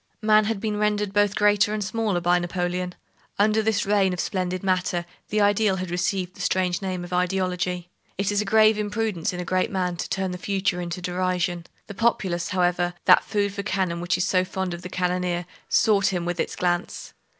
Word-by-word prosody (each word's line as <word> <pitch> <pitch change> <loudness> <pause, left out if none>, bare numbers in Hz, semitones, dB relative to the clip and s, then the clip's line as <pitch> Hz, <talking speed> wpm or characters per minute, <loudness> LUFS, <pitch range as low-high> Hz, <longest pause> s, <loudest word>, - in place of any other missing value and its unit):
Man 215 0 +5
had 220 -1 -1
been 210 0 -2
rendered 210 -1 0
both 205 -1 +2
greater 210 0 +3
and 210 - -2
smaller 205 -1 -1
by 175 +1 +3
Napoleon. 180 +1 -2 0.4
Under 215 +2 +3
this 220 -1 0
reign 195 -2 +2
of 180 - -5
splendid 185 -2 -2
matter, 185 -2 0 0.2
the 210 0 +1
ideal 205 -1 +3
had 185 -2 -4
received 180 +1 -1
the 195 - -10
strange 180 0 0
name 185 -2 -3
of 175 +1 -8
ideology! 180 -1 -1 0.3
It 195 +1 0
is 205 0 +1
a - - -1
grave 215 +1 +4
imprudence 210 -4 -1
in 180 - -6
a 180 - -4
great 185 +1 0
man 180 -2 -2
to - - -4
turn 190 -1 -1
the 180 - -6
future 190 -2 -1
into 175 +1 -5
derision. 180 -1 -1 0.2
The - - -8
populace, 190 -6 0
however, 175 -1 +1
that - - +7
food 200 -2 -1
for 200 - -3
cannon 190 -4 -1
which 175 0 0
is 180 - +1
so 185 -2 +2
fond 185 -1 -3
of 175 - -7
the 180 - -7
cannoneer, 180 -1 -1 0.2
sought 205 -3 +3
him 180 -3 -1
with 175 0 -3
its - - -2
glance. 175 0 -2
185 Hz, 205 wpm, -24 LUFS, 180-205 Hz, 0.4 s, that